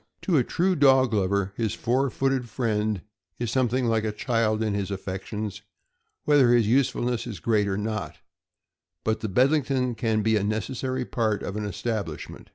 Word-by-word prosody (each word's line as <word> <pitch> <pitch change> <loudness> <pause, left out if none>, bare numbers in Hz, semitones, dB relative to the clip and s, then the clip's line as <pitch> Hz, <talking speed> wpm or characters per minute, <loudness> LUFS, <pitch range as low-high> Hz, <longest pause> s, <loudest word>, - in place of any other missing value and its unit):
To 180 - +1
a 130 - +4
true 185 +8 +1
dog 135 -5 +5
lover 100 -1 0
his 110 -2 -1
four 130 +3 +1
footed 135 -2 -1
friend 105 -4 -1 0.3
is 120 -2 -2
some 130 -2 +2
thing 125 +2 0
like 115 -2 +1
a 110 - -1
child 110 0 0
in 105 -2 0
his 100 -1 -2
affections, 100 +2 -5 0.6
whether 145 -5 +5
his 120 -2 +4
usefulness 125 -1 +1
is 110 -5 -6
great 105 -3 +1
or 95 -1 -1
not; 105 0 -3 0.9
but 110 0 0
the 110 -1 -3
Bedlington 130 +2 +2
can 110 -2 0
be 110 0 +3
a 100 - 0
necessary 125 +4 -2
part 110 -4 -1
of 100 - -4
an 105 0 -3
establishment. 105 -6 -4
110 Hz, 170 wpm, -26 LUFS, 105-125 Hz, 0.9 s, dog